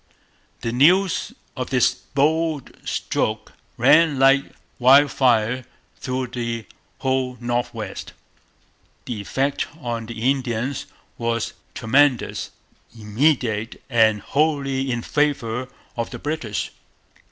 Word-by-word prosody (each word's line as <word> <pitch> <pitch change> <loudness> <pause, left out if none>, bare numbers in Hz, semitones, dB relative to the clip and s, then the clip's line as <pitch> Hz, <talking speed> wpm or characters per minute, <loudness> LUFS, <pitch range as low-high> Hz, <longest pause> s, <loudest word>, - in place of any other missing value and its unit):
The 115 - -2
news 175 +9 +3 0.2
of 130 -3 -4
this 130 -2 +3
bold 155 +1 0
stroke - - -2 0.2
ran 160 -3 +5
like 135 +1 +5 0.3
wildfire 130 -3 +4 0.3
through 130 -1 -3
the 115 -2 -4 0.3
whole 130 -1 -1
North 120 0 -1
West. - - -7 0.9
The 110 -4 -4
effect 135 +7 -1
on 115 -5 -4
the 115 -1 -6
Indians 130 0 -2 0.3
was 115 -1 -1 0.2
tremendous, 130 +2 +2 0.5
immediate, 110 -1 0
and 110 -3 +4
wholly 140 -2 0
in 120 -1 -2
favour 130 -5 0 0.3
of 115 -1 -2
the 125 - -7
British. 120 -8 -3
130 Hz, 100 wpm, -22 LUFS, 115-140 Hz, 0.9 s, ran